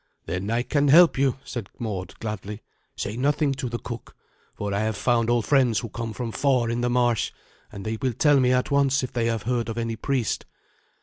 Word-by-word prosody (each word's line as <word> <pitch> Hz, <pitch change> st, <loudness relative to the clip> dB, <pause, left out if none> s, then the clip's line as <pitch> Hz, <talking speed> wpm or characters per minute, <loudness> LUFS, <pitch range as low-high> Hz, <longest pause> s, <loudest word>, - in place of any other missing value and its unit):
"Then 95 Hz, +3 st, -3 dB
I 115 Hz, +2 st, +1 dB
can 145 Hz, +2 st, +1 dB
help 165 Hz, +4 st, +7 dB
you," 135 Hz, -2 st, +1 dB
said 115 Hz, -6 st, -6 dB
Mord 95 Hz, -5 st, -5 dB
gladly. 105 Hz, -1 st, -5 dB, 0.3 s
"Say 105 Hz, -, -4 dB
nothing 145 Hz, +3 st, +1 dB
to 135 Hz, -2 st, -4 dB
the 120 Hz, -, -3 dB
cook, 120 Hz, 0 st, -8 dB, 0.4 s
for 100 Hz, -1 st, -3 dB
I 100 Hz, -, 0 dB
have 110 Hz, -1 st, -1 dB
found 115 Hz, -1 st, +2 dB
old 120 Hz, -2 st, +2 dB
friends 130 Hz, -6 st, +3 dB
who 115 Hz, -, -6 dB
come 115 Hz, +1 st, -5 dB
from 115 Hz, 0 st, -4 dB
far 125 Hz, -3 st, +1 dB
in 120 Hz, +1 st, -1 dB
the 120 Hz, -, +1 dB
marsh, 120 Hz, -2 st, +1 dB, 0.4 s
and 100 Hz, -2 st, -8 dB
they 110 Hz, 0 st, -3 dB
will 130 Hz, -2 st, 0 dB
tell 145 Hz, +4 st, +4 dB
me 125 Hz, -1 st, +3 dB
at 125 Hz, +3 st, +1 dB
once 140 Hz, -1 st, +3 dB
if 130 Hz, -, -5 dB
they 115 Hz, -1 st, 0 dB
have 115 Hz, -2 st, -1 dB
heard 120 Hz, 0 st, -1 dB
of 115 Hz, -, -4 dB
any 115 Hz, -1 st, -2 dB
priest. 125 Hz, 0 st, -1 dB
120 Hz, 220 wpm, -25 LUFS, 110-130 Hz, 0.4 s, help